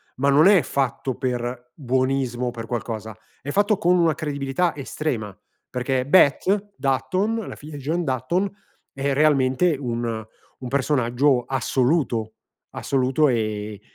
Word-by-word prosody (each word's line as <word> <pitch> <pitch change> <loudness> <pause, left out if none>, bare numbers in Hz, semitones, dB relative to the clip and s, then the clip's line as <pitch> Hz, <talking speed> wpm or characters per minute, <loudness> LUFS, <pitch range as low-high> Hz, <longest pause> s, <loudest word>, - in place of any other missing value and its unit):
Ma 140 +2 +1
non 150 +5 +6
è 195 -4 +6
fatto 130 -1 -2
per 125 -1 -4
buonismo 130 -2 -1
per 115 -1 -7
qualcosa, 110 -2 -5 0.2
è 145 - -5
fatto 205 +2 +2
con 180 +1 +3
una 165 -3 +3
credibilità 145 +2 -1
estrema. 130 -7 -4 0.3
Perché 130 0 -1
Beth 195 +6 +3
Dutton, 185 +11 -1
la - - -7
figlia 150 +1 -10
di - - -8
John 165 +5 -1
Dutton 160 +9 -1 0.4
è 135 0 -1
realmente 145 +2 +3
un 115 -3 -3 0.4
un 125 - -4
personaggio 130 -1 +2
assoluto, 125 -3 0 0.3
assoluto 135 +3 +1
e 105 -3 -2
135 Hz, 130 wpm, -23 LUFS, 120-155 Hz, 0.4 s, non